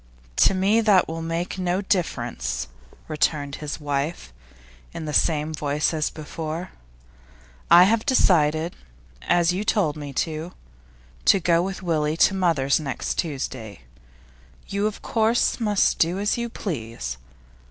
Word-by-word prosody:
'To 195 Hz, -, +4 dB
me 200 Hz, +4 st, +3 dB
that 205 Hz, -4 st, +4 dB
will 165 Hz, +1 st, -5 dB
make 165 Hz, +3 st, -3 dB
no 180 Hz, 0 st, 0 dB
difference,' 120 Hz, -, -2 dB, 0.4 s
returned 150 Hz, -2 st, -1 dB
his 150 Hz, +1 st, -5 dB
wife, 145 Hz, -, -3 dB, 0.6 s
in 160 Hz, -, -5 dB
the 150 Hz, -, -4 dB
same 155 Hz, 0 st, +2 dB
voice 150 Hz, +1 st, 0 dB
as 155 Hz, -1 st, 0 dB
before. 160 Hz, +2 st, -6 dB, 1.0 s
'I 175 Hz, +1 st, +9 dB
have 220 Hz, +4 st, +2 dB
decided 165 Hz, -, +3 dB, 0.5 s
as 175 Hz, 0 st, +2 dB
you 190 Hz, +3 st, -2 dB
told 195 Hz, -8 st, +1 dB
me 145 Hz, -2 st, -7 dB
to 160 Hz, +5 st, -3 dB, 0.7 s
to 195 Hz, -, +6 dB
go 170 Hz, -1 st, +3 dB
with 190 Hz, +1 st, -4 dB
Willie 155 Hz, -2 st, 0 dB
to 190 Hz, -, +4 dB
mother's 165 Hz, -8 st, +2 dB
next 140 Hz, -4 st, -3 dB
Tuesday. 130 Hz, -, -4 dB, 0.9 s
You, 200 Hz, +1 st, 0 dB
of 215 Hz, -, -6 dB
course, 225 Hz, +2 st, +1 dB
must 210 Hz, -3 st, +2 dB
do 170 Hz, +3 st, +2 dB
as 205 Hz, +1 st, 0 dB
you 235 Hz, 0 st, -3 dB
please. 115 Hz, -, -5 dB
165 Hz, 135 wpm, -24 LUFS, 150-190 Hz, 1.0 s, I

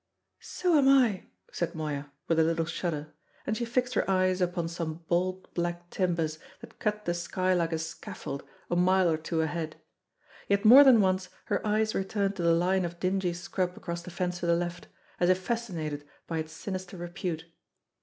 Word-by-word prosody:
"So 350 Hz, -4 st, +1 dB
am 270 Hz, -1 st, +5 dB
I," 245 Hz, -8 st, +4 dB, 0.2 s
said 170 Hz, -, -2 dB
Moya, 145 Hz, -2 st, -4 dB, 0.2 s
with 165 Hz, -1 st, +2 dB
a -, -, +6 dB
little 165 Hz, 0 st, +1 dB
shudder; 155 Hz, -3 st, -3 dB, 0.3 s
and 215 Hz, -, 0 dB
she 235 Hz, -, -2 dB
fixed 250 Hz, +2 st, 0 dB
her -, -, 0 dB
eyes 185 Hz, -1 st, +2 dB
upon 175 Hz, -2 st, 0 dB
some 165 Hz, -1 st, -5 dB
bold 185 Hz, +2 st, -1 dB
black 175 Hz, 0 st, -3 dB
timbers 165 Hz, -4 st, 0 dB, 0.2 s
that -, -, -14 dB
cut 210 Hz, 0 st, -1 dB
the 175 Hz, -, +1 dB
sky 185 Hz, +2 st, 0 dB
like 170 Hz, -2 st, +1 dB
a 160 Hz, -, 0 dB
scaffold 155 Hz, -3 st, -6 dB, 0.3 s
a -, -, +2 dB
mile 185 Hz, +1 st, +4 dB
or 160 Hz, -, +1 dB
two 160 Hz, +1 st, -1 dB
ahead; 160 Hz, 0 st, -3 dB, 0.7 s
yet 200 Hz, +2 st, +1 dB
more 255 Hz, +6 st, +11 dB
than 255 Hz, -5 st, +7 dB
once 185 Hz, -1 st, +1 dB, 0.2 s
her -, -, -1 dB
eyes 215 Hz, +1 st, +2 dB
returned 200 Hz, 0 st, -1 dB
to -, -, -2 dB
the 170 Hz, 0 st, +4 dB
line 180 Hz, +3 st, +2 dB
of 170 Hz, 0 st, -5 dB
dingy 185 Hz, -1 st, 0 dB
scrub 180 Hz, +1 st, -3 dB
across 170 Hz, 0 st, -5 dB
the 175 Hz, -, -9 dB
fence 180 Hz, 0 st, -2 dB
to 175 Hz, -, -2 dB
the 170 Hz, -, +4 dB
left, 175 Hz, +1 st, -3 dB, 0.3 s
as 175 Hz, -, +3 dB
if 185 Hz, -, +5 dB
fascinated 180 Hz, -8 st, -3 dB, 0.2 s
by 165 Hz, -1 st, -2 dB
its 155 Hz, 0 st, -5 dB
sinister 185 Hz, -1 st, -6 dB
repute. 175 Hz, -1 st, -4 dB
175 Hz, 190 wpm, -29 LUFS, 165-190 Hz, 0.7 s, more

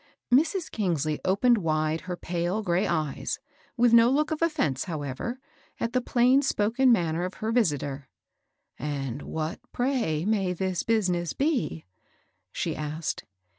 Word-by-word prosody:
Mrs. 320 Hz, +6 st, +2 dB
Eingsley 160 Hz, -7 st, -1 dB
opened 220 Hz, +5 st, +3 dB
wide 155 Hz, -2 st, 0 dB
her 180 Hz, -, -1 dB
pale 175 Hz, +5 st, -2 dB
gray 180 Hz, 0 st, +1 dB
eyes, 155 Hz, -5 st, -1 dB, 0.2 s
— -, -, -33 dB
with 240 Hz, -1 st, +4 dB
no 230 Hz, 0 st, +7 dB
look 300 Hz, +4 st, +1 dB
of 315 Hz, -, -2 dB
offence, 295 Hz, -, +1 dB
however, 155 Hz, -, -4 dB, 0.2 s
— -, -, -33 dB
at 230 Hz, -, -2 dB
the 255 Hz, -, +2 dB
plaiuHspoken 250 Hz, -1 st, +3 dB
manner 170 Hz, -7 st, +2 dB
of 185 Hz, +1 st, -4 dB
her 220 Hz, +1 st, -2 dB
visitor. 145 Hz, -, 0 dB, 0.4 s
" -, -, -43 dB
And 140 Hz, -2 st, -3 dB
what, 160 Hz, +3 st, -4 dB
pray, 240 Hz, -, 0 dB
may 195 Hz, -4 st, +1 dB
this 185 Hz, -1 st, -1 dB
business 180 Hz, -7 st, 0 dB
be? 260 Hz, -, -1 dB, 0.3 s
" -, -, -44 dB
she -, -, -2 dB
asked. 155 Hz, +1 st, -4 dB
185 Hz, 150 wpm, -27 LUFS, 155-240 Hz, 0.4 s, no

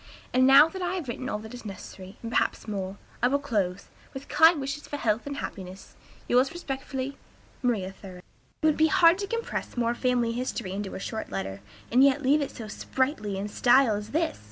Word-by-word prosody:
And 255 Hz, +1 st, +5 dB
now 275 Hz, +3 st, +9 dB
that 375 Hz, +3 st, -7 dB
I 360 Hz, +1 st, -1 dB
have 345 Hz, -7 st, -4 dB
written 255 Hz, +2 st, -4 dB
all -, -, -1 dB
that 220 Hz, +2 st, -10 dB
is 245 Hz, -, -9 dB
necessary, 195 Hz, -1 st, -9 dB
and 230 Hz, -, -5 dB
perhaps 240 Hz, -, 0 dB
more, 195 Hz, -2 st, -4 dB, 0.2 s
I 245 Hz, -, +5 dB
will 275 Hz, +3 st, +2 dB
close, 200 Hz, -9 st, -2 dB, 0.3 s
with 270 Hz, +1 st, -7 dB
kind 320 Hz, +1 st, +6 dB
wishes 280 Hz, +2 st, -4 dB
for 290 Hz, -, -4 dB
health 225 Hz, -1 st, 0 dB
and 285 Hz, -1 st, -4 dB
happiness. 190 Hz, -5 st, -8 dB, 0.3 s
Yours 255 Hz, +2 st, +3 dB
respectfully, 270 Hz, -4 st, -5 dB, 0.4 s
"MARIA 215 Hz, -7 st, 0 dB
THOREAU." 185 Hz, -2 st, -10 dB, 0.4 s
It -, -, +3 dB
would 310 Hz, -1 st, +4 dB
be 315 Hz, -, +5 dB
hard 335 Hz, +3 st, +5 dB
to 400 Hz, -, -3 dB
compress 465 Hz, -, -4 dB
more 235 Hz, 0 st, +1 dB
family 245 Hz, -1 st, +1 dB
history 235 Hz, -4 st, -3 dB
into 195 Hz, 0 st, -4 dB
a -, -, -5 dB
short 220 Hz, +3 st, -5 dB
letter, 95 Hz, 0 st, -4 dB, 0.3 s
and 250 Hz, +3 st, +6 dB
yet 280 Hz, +1 st, +4 dB
leave 285 Hz, +4 st, +4 dB
it 280 Hz, -, -2 dB
so 225 Hz, -3 st, -8 dB
sprightly 215 Hz, -3 st, -2 dB
in 200 Hz, +1 st, -3 dB
style 245 Hz, +2 st, +4 dB
as 210 Hz, +1 st, -4 dB
this. 325 Hz, +2 st, -1 dB
250 Hz, 205 wpm, -27 LUFS, 210-285 Hz, 0.4 s, now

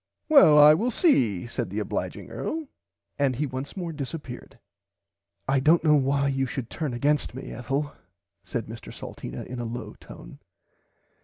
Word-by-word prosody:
Well 190 Hz, -, +8 dB
I 150 Hz, +1 st, +9 dB
will 220 Hz, +10 st, +1 dB
see 125 Hz, -, +2 dB
said 120 Hz, -3 st, -4 dB
the 100 Hz, -, -6 dB
obliging 105 Hz, -, -4 dB
earl 315 Hz, -1 st, -4 dB, 0.5 s
and 135 Hz, -3 st, +2 dB
he 145 Hz, +5 st, -1 dB
once 130 Hz, +5 st, -6 dB
more 170 Hz, -3 st, -4 dB
disapeared. 140 Hz, -3 st, -7 dB, 0.9 s
I 135 Hz, 0 st, +3 dB
dont 160 Hz, +5 st, +4 dB
know 155 Hz, -2 st, +5 dB
why 140 Hz, 0 st, +2 dB
you 135 Hz, -1 st, 0 dB
should 120 Hz, -2 st, -5 dB
turn 150 Hz, -7 st, -3 dB
against 145 Hz, 0 st, 0 dB
me 130 Hz, -, -7 dB
Ethel 135 Hz, +5 st, -3 dB, 0.5 s
said -, -, -4 dB
Mr -, -, -9 dB
Salteena 60 Hz, +1 st, -8 dB
in 125 Hz, 0 st, -7 dB
a -, -, -3 dB
low 120 Hz, +2 st, -6 dB
tone. -, -, -12 dB
140 Hz, 160 wpm, -26 LUFS, 125-150 Hz, 0.9 s, I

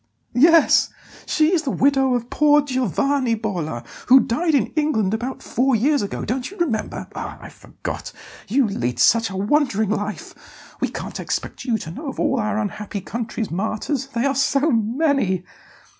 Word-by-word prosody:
"Yes; 325 Hz, +6 st, +5 dB, 0.4 s
she 310 Hz, +3 st, +2 dB
is 340 Hz, -, +3 dB
the 295 Hz, -, -3 dB
widow 270 Hz, -1 st, +2 dB
of 240 Hz, 0 st, -4 dB
poor 295 Hz, 0 st, +4 dB
Giovanni 260 Hz, -, 0 dB
Bolla, 175 Hz, -, -4 dB, 0.2 s
who 260 Hz, +2 st, +8 dB
died 300 Hz, +6 st, +1 dB
in 250 Hz, -7 st, 0 dB
England 280 Hz, -11 st, +1 dB
about 245 Hz, +4 st, -4 dB
four 260 Hz, +1 st, +1 dB
years 280 Hz, +6 st, +2 dB
ago, 200 Hz, -1 st, -4 dB
don't 250 Hz, +2 st, -2 dB
you 400 Hz, -, -13 dB
remember? 270 Hz, -11 st, -2 dB
Ah, -, -, -6 dB
I -, -, -10 dB
forgot -, -, -7 dB, 0.4 s
you 255 Hz, +5 st, +2 dB
lead 125 Hz, -, -2 dB
such 230 Hz, -, +4 dB
a 190 Hz, -, -6 dB
wandering 220 Hz, -1 st, +1 dB
life; 210 Hz, -1 st, -3 dB, 0.5 s
we -, -, +2 dB
can't -, -, -6 dB
expect -, -, -4 dB
you 235 Hz, -4 st, +1 dB
to 160 Hz, -6 st, -7 dB
know 290 Hz, -, -7 dB
of 270 Hz, -, -8 dB
all 265 Hz, -, +1 dB
our 210 Hz, -1 st, -1 dB
unhappy 210 Hz, -1 st, -4 dB
country's 225 Hz, +2 st, -4 dB
martyrs 220 Hz, -, -2 dB
they 245 Hz, -2 st, -2 dB
are 275 Hz, -, +2 dB
so 275 Hz, +3 st, +2 dB
many!" 230 Hz, -, +1 dB
245 Hz, 170 wpm, -21 LUFS, 210-280 Hz, 0.5 s, who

